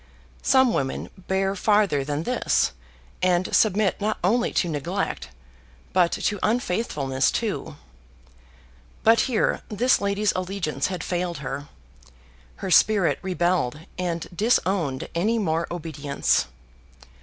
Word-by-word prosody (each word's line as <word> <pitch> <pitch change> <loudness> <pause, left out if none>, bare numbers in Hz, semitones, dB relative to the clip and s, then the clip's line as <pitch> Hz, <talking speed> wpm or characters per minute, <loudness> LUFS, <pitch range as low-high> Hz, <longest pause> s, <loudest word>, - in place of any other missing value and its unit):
Some 260 -3 +4
women 135 -1 -2
bear 190 +1 -1
farther 200 -7 +2
than 145 +2 -2
this, 245 - +1 0.5
and 180 0 +2
submit 210 -2 +2
not 215 +1 0
only 235 +7 +2
to 180 - +1
neglect 145 -4 -3 0.6
but 180 -2 +4
to 205 -2 -1
unfaithfulness 180 - 0
too 210 -8 -3 1.3
but 225 +1 +6
here 235 - +1
this 240 +5 +2
lady's 200 +1 +1
allegiance 180 -7 -2
had 185 -1 -4
failed 175 -2 -2
her. 140 +1 -5 0.9
Her 190 - -5
spirit 200 -1 +4
rebelled, 175 -6 0
and 170 -3 -3
disowned 185 - +1
any 210 +7 +1
more 165 -5 0
obedience. 150 - -1
185 Hz, 110 wpm, -24 LUFS, 160-210 Hz, 1.3 s, but